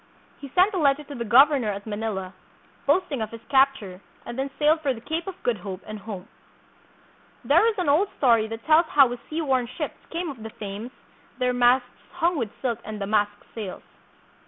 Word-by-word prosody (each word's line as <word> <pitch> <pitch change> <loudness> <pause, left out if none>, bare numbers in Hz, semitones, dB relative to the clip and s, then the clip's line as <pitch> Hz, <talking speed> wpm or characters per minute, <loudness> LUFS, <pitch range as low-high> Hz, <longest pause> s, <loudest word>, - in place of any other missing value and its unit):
He 280 - -9
sent 375 +4 +5
a 375 - 0
letter 285 -1 +3
to 290 - -10
the 240 -4 -4
governor 260 +2 +5
at 200 0 -4
Manila, 205 -3 -4 0.5
boast 370 - +4
ing 270 -5 -2
of 220 - -2
his 230 0 -11
capture, 265 -9 +2 0.2
and 240 - -6
then 270 +2 -2
sailed 310 +2 +3
for 275 -4 0
the - - -9
Cape 320 +8 -4
of 385 - -5
Good 240 -3 +1
Hope 185 0 -7
and 215 0 -7
home. 200 -2 -8 1.2
There 450 - +5
is 455 - +1
an 365 - -1
old 310 +8 +4
story 230 -5 +4
that 225 +1 -8
tells 320 +2 +5
how 275 -5 +5
his 245 - -5
seaworn 270 -6 0
ships 295 +4 -6
came 335 -1 -3
up 250 -5 -12
the 220 - -6
Thames, 205 +3 -6 0.5
their 250 0 +1
masts 245 +1 +4 0.3
hung 345 +2 +1
with 235 -8 -2
silk 235 -3 -1
and 215 -1 -6
damask 205 +1 +1 0.2
sails. 210 -5 -6
245 Hz, 200 wpm, -25 LUFS, 215-295 Hz, 1.2 s, sent